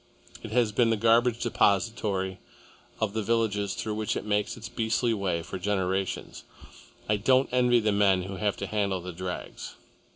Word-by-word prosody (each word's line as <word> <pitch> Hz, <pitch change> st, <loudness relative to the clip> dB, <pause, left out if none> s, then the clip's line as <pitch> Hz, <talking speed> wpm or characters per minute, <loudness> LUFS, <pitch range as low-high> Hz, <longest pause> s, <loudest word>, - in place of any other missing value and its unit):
It 110 Hz, -, -7 dB
has 115 Hz, -2 st, +2 dB
been 115 Hz, +2 st, +3 dB
the 115 Hz, -, +2 dB
garbage 115 Hz, +2 st, +3 dB
depository 100 Hz, -4 st, +1 dB, 0.6 s
of 110 Hz, -2 st, -1 dB
the 110 Hz, -, -1 dB
villages 105 Hz, -3 st, 0 dB
through 110 Hz, -, -3 dB
which 105 Hz, -1 st, -2 dB
it -, -, -5 dB
makes 105 Hz, +1 st, 0 dB
its 115 Hz, -, -7 dB
beastly 115 Hz, +1 st, 0 dB
way, 95 Hz, -5 st, -1 dB
for 90 Hz, -, -6 dB
generations. 95 Hz, 0 st, -2 dB, 0.6 s
I 105 Hz, -, +2 dB
don't 130 Hz, +5 st, +3 dB
envy 125 Hz, -1 st, +4 dB
the 110 Hz, -1 st, +1 dB
men 100 Hz, -2 st, +3 dB
who 95 Hz, +1 st, -6 dB
have 105 Hz, 0 st, -1 dB
to -, -, -4 dB
handle 100 Hz, -3 st, -1 dB
the 90 Hz, 0 st, -7 dB
drags." 90 Hz, +1 st, -6 dB
105 Hz, 170 wpm, -27 LUFS, 95-115 Hz, 0.6 s, envy